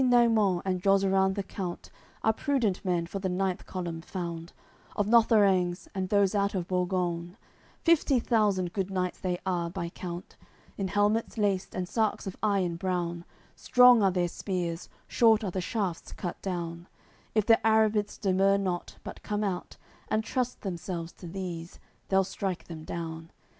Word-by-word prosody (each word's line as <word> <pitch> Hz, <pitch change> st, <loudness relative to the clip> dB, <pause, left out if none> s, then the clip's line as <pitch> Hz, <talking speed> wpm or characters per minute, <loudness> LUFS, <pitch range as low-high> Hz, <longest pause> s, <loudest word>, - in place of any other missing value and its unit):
AOI. -, -, +4 dB
CCXXIV 255 Hz, -, +3 dB
Between 240 Hz, -2 st, +5 dB
Naimon 195 Hz, -5 st, +2 dB
and 185 Hz, -2 st, -1 dB
Jozeran 195 Hz, 0 st, +3 dB
the 200 Hz, -, -2 dB
count 185 Hz, -2 st, -6 dB, 0.3 s
Are 220 Hz, -, +4 dB
prudent 230 Hz, -7 st, 0 dB
men 175 Hz, -2 st, 0 dB
for 195 Hz, +4 st, -5 dB
the 190 Hz, -1 st, -2 dB
ninth 185 Hz, 0 st, -1 dB
column 170 Hz, -3 st, -4 dB
found, 170 Hz, -2 st, -5 dB, 0.4 s
Of 205 Hz, -, +1 dB
Lotherengs 200 Hz, -5 st, +4 dB
and 190 Hz, -2 st, -2 dB
those 200 Hz, -1 st, +3 dB
out 200 Hz, -1 st, +1 dB
of 175 Hz, -2 st, -2 dB
Borgoune; 180 Hz, -1 st, -1 dB, 0.5 s
Fifty 310 Hz, -6 st, +4 dB
thousand 205 Hz, -7 st, +1 dB
good 195 Hz, -2 st, -1 dB
knights 185 Hz, -2 st, -2 dB
they 180 Hz, -1 st, -1 dB
are, 175 Hz, -2 st, 0 dB
by 170 Hz, 0 st, -4 dB
count; 175 Hz, +1 st, -7 dB, 0.4 s
In 195 Hz, -, -2 dB
helmets 205 Hz, +4 st, +1 dB
laced 200 Hz, -3 st, 0 dB
and 185 Hz, -1 st, -2 dB
sarks 220 Hz, +2 st, 0 dB
of 195 Hz, -, -5 dB
iron 195 Hz, -5 st, +1 dB
brown, 175 Hz, -2 st, -2 dB, 0.3 s
Strong 250 Hz, -2 st, +6 dB
are 195 Hz, -, +5 dB
their 180 Hz, -1 st, +1 dB
spears, 175 Hz, -2 st, -3 dB, 0.2 s
short 225 Hz, -2 st, +4 dB
are 195 Hz, -, -2 dB
the 185 Hz, -, -2 dB
shafts 195 Hz, -4 st, -3 dB
cut 175 Hz, -, -5 dB
down; 170 Hz, -2 st, -4 dB, 0.5 s
If 215 Hz, -2 st, +3 dB
the 225 Hz, 0 st, +6 dB
Arrabits 220 Hz, -1 st, +2 dB
demur 195 Hz, 0 st, +3 dB
not, 185 Hz, -3 st, -3 dB
but -, -, -8 dB
come 210 Hz, 0 st, -2 dB
out 190 Hz, -3 st, -3 dB, 0.3 s
And 215 Hz, 0 st, +1 dB
trust 250 Hz, +2 st, -2 dB
themselves 175 Hz, -3 st, -4 dB
to 175 Hz, -, -11 dB
these, 175 Hz, -2 st, -6 dB, 0.3 s
they'll 195 Hz, 0 st, +4 dB
strike 190 Hz, -1 st, -3 dB
them 160 Hz, -2 st, -9 dB
down. 165 Hz, -1 st, -5 dB
190 Hz, 170 wpm, -29 LUFS, 175-205 Hz, 0.5 s, Strong